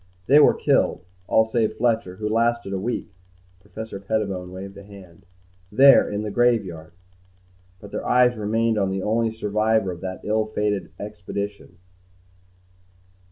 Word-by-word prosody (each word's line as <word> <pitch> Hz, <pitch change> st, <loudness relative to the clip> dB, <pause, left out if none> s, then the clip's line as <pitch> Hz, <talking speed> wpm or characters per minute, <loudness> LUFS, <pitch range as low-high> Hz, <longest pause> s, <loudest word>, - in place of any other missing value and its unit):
They 140 Hz, +7 st, +6 dB
were 150 Hz, -, +6 dB
killed, -, -, +1 dB, 0.2 s
all 110 Hz, -, +4 dB
save 110 Hz, 0 st, 0 dB
Fletcher, 115 Hz, -6 st, 0 dB
who 105 Hz, +2 st, -4 dB
lasted 115 Hz, -1 st, 0 dB
a 95 Hz, -, -2 dB
week." 115 Hz, 0 st, -4 dB, 0.5 s
Professor 105 Hz, +1 st, -8 dB
Pettibone 100 Hz, -3 st, -3 dB
waved 95 Hz, +1 st, -8 dB
a -, -, -10 dB
hand. 100 Hz, -1 st, -15 dB, 0.4 s
"There 135 Hz, +5 st, +6 dB
in 105 Hz, +1 st, -3 dB
the 105 Hz, -, -4 dB
graveyard." 100 Hz, -9 st, 0 dB, 0.9 s
But 100 Hz, 0 st, -12 dB
their -, -, -4 dB
eyes 125 Hz, 0 st, +4 dB
remained 110 Hz, +1 st, 0 dB
on 95 Hz, -1 st, +1 dB
the 95 Hz, 0 st, -3 dB
only 115 Hz, +2 st, +1 dB
survivor 110 Hz, -1 st, 0 dB
of 85 Hz, -, -9 dB
that 95 Hz, -1 st, -6 dB
ill 110 Hz, +1 st, 0 dB
fated 105 Hz, -2 st, -1 dB
first -, -, -11 dB
expedition. 100 Hz, -2 st, -6 dB
105 Hz, 150 wpm, -23 LUFS, 95-110 Hz, 0.9 s, They